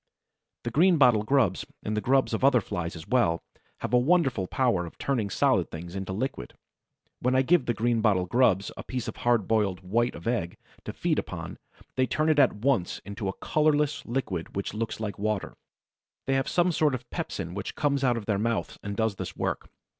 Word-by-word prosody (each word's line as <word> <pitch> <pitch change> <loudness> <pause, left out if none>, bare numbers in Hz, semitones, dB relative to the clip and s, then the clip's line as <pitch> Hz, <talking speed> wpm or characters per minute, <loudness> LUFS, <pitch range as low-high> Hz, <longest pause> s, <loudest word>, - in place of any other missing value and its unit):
The 120 - -3
Greenbottle 140 - +5
grubs, 125 -10 +2 0.2
and 105 - -2
the 105 - 0
grubs 135 +5 +2
of - - -1
other 135 -2 +6
Flies 90 -4 -4
as 80 -1 -9
well, 85 -10 +2 0.4
have - - -4
a 125 - +6
wonderful 135 - +2
power 115 -9 +1
of - - -13
turning 120 -7 -1
solid - - +2
things 85 +2 -8
into 95 -1 -4
liquid. 105 - -4 0.6
When 125 +1 +1
I 130 - +4
give 165 0 +3
the 120 - +1
Greenbottle 110 -5 +2
grubs 105 -4 +2
a - - -6
piece 125 -3 -4
of - - -5
hard 120 -5 +2
boiled 100 -4 +1
white 115 +6 0
of 85 - -10
egg 115 -8 -1 0.3
to - - -5
feed - - 0
upon, - - -6 0.4
they 130 0 +3
turn 155 +4 +1
it 155 -2 +4
at 135 - +5
once 110 -4 0
into 100 0 -5
a 95 - -4
colorless 150 -2 +1
liquid 110 -9 -3
which 100 0 -3
looks 110 +1 -3
like 105 -3 -4
water. 105 -1 -1 0.7
They 135 - 0
have 135 -1 +1
some 175 0 +2
sort 150 -4 +2
of 125 -1 -8
pepsin 85 -3 -4
which 100 0 -5
comes 140 -2 0
out 125 -2 +3
of 110 - -5
their 100 -2 0
mouths 115 0 -2
and 100 0 -5
does 110 -3 0
this - - -6
work. - - -2
115 Hz, 200 wpm, -27 LUFS, 100-135 Hz, 0.7 s, other